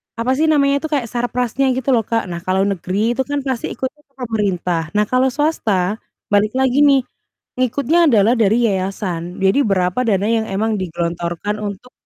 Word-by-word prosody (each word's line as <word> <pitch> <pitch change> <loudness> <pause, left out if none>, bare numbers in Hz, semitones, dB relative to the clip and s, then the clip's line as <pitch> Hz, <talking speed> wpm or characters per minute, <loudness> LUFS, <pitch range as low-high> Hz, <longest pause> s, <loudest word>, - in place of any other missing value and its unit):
apa 230 +3 -1
sih 315 - +2
namanya 280 -2 +3
itu - - -1
kayak 275 -6 0
sarprasnya 245 +2 0
gitu 260 +1 -1
loh, 230 -5 +2
Kak. 225 -4 -1
Nah, 170 - -4
kalau 190 +1 +1
negeri 200 +4 -1
itu 265 - +1
kan 290 0 -2
pasti 260 -4 -3
ikutnya 270 +3 -6
ke 275 - -43
pemerintah. 200 -8 -1
Nah, 210 0 +3
kalau 255 +1 +3
swasta 215 - 0 0.3
balik 210 +2 +2
lagi 265 +1 +2
nih 275 -2 +5 0.5
ngikutnya 280 +6 +2
adalah 225 +1 +4
dari 230 +1 +3
yayasan. 185 -3 -3
Jadi 195 +9 +3
berapa 185 -1 0
dana 205 -2 +1
yang 225 -1 +1
emang 215 +3 0
digelontorkan 175 +2 -3
untuk, 205 +5 -6
225 Hz, 175 wpm, -18 LUFS, 195-260 Hz, 0.5 s, nih